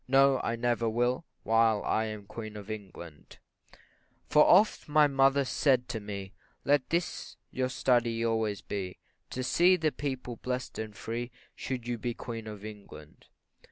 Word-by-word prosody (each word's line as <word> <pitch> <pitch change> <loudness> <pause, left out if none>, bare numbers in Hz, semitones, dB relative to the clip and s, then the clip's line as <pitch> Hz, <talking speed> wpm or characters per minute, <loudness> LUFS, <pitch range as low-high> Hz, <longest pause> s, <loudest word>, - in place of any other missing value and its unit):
no, 135 0 +5
I 115 - 0
never 115 -1 0
will, 120 +6 0 0.2
While 115 -2 +3
I 110 - +1
am 110 -2 -6
Queen 110 0 -7
of 105 +1 -8
England; 90 -7 -9 0.9
For 150 - +5
oft 200 -3 +4
my 150 0 +6
mother 135 0 +3
said 130 -1 +2
to 110 - -3
me, 100 -1 -7 0.3
Let 145 -1 +2
this 170 +1 -2
your 130 0 -1
study 120 -3 +1
always 110 -3 0
be, 95 -3 -5 0.3
To 130 - -4
see 175 +8 +5
the 160 -3 0
people 130 -5 -4
blest 125 0 -4
and 110 -1 -5
free, 120 +2 -4 0.2
Should 125 -3 -5
you 120 -1 -2
be 120 +1 -3
Queen 115 -2 -6
of 105 -1 -8
England. 100 -8 -12
115 Hz, 155 wpm, -30 LUFS, 110-130 Hz, 0.9 s, my